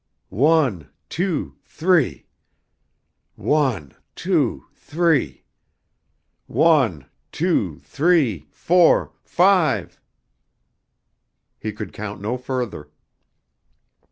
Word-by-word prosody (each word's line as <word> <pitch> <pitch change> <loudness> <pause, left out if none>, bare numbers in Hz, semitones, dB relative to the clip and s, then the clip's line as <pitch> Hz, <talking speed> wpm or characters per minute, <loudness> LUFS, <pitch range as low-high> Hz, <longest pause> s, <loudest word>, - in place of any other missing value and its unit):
"One, 130 - +1 0.2
two, 175 -2 -3
three. 155 - 0 1.1
One, 125 - 0 0.2
two, - - -1
three. 150 - -1 1.0
One, 130 - +2 0.3
two, - - -1
three, 140 - +1
four, 175 - +3
five." 170 - +1 1.6
He 110 - -4
could 105 0 -8
count 105 0 -7
no 105 +5 -3
further. 125 -3 -5
130 Hz, 70 wpm, -21 LUFS, 105-165 Hz, 1.6 s, four